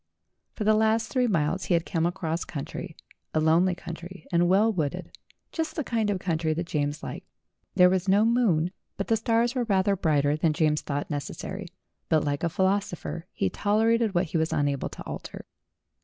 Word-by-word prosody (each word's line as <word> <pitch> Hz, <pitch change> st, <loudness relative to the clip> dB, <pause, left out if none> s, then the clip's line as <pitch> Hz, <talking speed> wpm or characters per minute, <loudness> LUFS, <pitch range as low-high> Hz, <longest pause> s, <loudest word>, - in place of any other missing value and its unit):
For 215 Hz, -, -3 dB
the 215 Hz, +1 st, +4 dB
last 220 Hz, +1 st, +2 dB
three 250 Hz, -1 st, +2 dB
miles 180 Hz, -2 st, 0 dB
he 175 Hz, -, +2 dB
had 170 Hz, 0 st, 0 dB
come 165 Hz, -1 st, 0 dB
across 170 Hz, -1 st, -2 dB
country, 140 Hz, -4 st, -6 dB, 0.4 s
a -, -, +4 dB
lonely 170 Hz, +4 st, +3 dB
country 170 Hz, 0 st, -9 dB
and 175 Hz, 0 st, +3 dB
well 210 Hz, +4 st, +4 dB
wooded, 155 Hz, -7 st, -3 dB, 0.4 s
just 320 Hz, -1 st, -3 dB
the 310 Hz, -, -1 dB
kind 225 Hz, -4 st, 0 dB
of 200 Hz, -, +1 dB
country 160 Hz, -3 st, -1 dB
that 170 Hz, +2 st, -2 dB
James 145 Hz, -2 st, -2 dB
liked. -, -, -7 dB, 0.5 s
There 180 Hz, -, +7 dB
was 185 Hz, +1 st, +1 dB
no 205 Hz, +3 st, +5 dB
moon, 205 Hz, -9 st, +2 dB, 0.3 s
but 200 Hz, -, -3 dB
the 225 Hz, -, +4 dB
stars 230 Hz, +2 st, +1 dB
were 250 Hz, -2 st, 0 dB
rather 195 Hz, -2 st, +2 dB
brighter 150 Hz, -5 st, +2 dB
than 155 Hz, 0 st, +1 dB
James 150 Hz, -1 st, +2 dB
thought 145 Hz, +1 st, -3 dB
necessary; 175 Hz, +6 st, -5 dB, 0.4 s
but 155 Hz, -2 st, +3 dB
like 145 Hz, +1 st, -2 dB
a 170 Hz, -, +2 dB
philosopher 190 Hz, -2 st, -1 dB
he -, -, -1 dB
tolerated 220 Hz, 0 st, +2 dB
what 175 Hz, +2 st, +3 dB
he 165 Hz, -, -2 dB
was 160 Hz, 0 st, 0 dB
unable 140 Hz, -2 st, 0 dB
to -, -, -9 dB
alter. -, -, -7 dB
180 Hz, 185 wpm, -27 LUFS, 160-210 Hz, 0.5 s, There